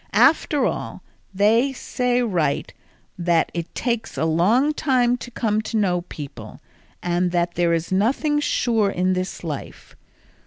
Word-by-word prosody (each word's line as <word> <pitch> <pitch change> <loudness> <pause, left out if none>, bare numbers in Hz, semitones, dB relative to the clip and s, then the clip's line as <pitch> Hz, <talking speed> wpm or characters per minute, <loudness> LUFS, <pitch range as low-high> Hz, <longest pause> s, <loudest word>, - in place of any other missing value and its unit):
After 300 -2 +4
all, - - -4 0.3
they 225 +7 +3
say 250 -1 -1
right 170 -10 -1 0.5
that 170 -1 +2
it 170 -1 -5
takes 235 -2 -2
a - - +1
long 210 - +3
time 255 -5 +2
to 245 - -9
come 220 -3 0
to 220 +1 -3
know 180 -4 +1
people, 140 -10 -9 0.4
and 175 +1 +1
that 175 0 0
there 175 -1 +1
is 165 +1 -1
nothing 265 +10 +1
sure 230 -7 +1
in 185 0 0
this 185 0 -4
life. 150 -5 -7
200 Hz, 145 wpm, -22 LUFS, 175-245 Hz, 0.5 s, After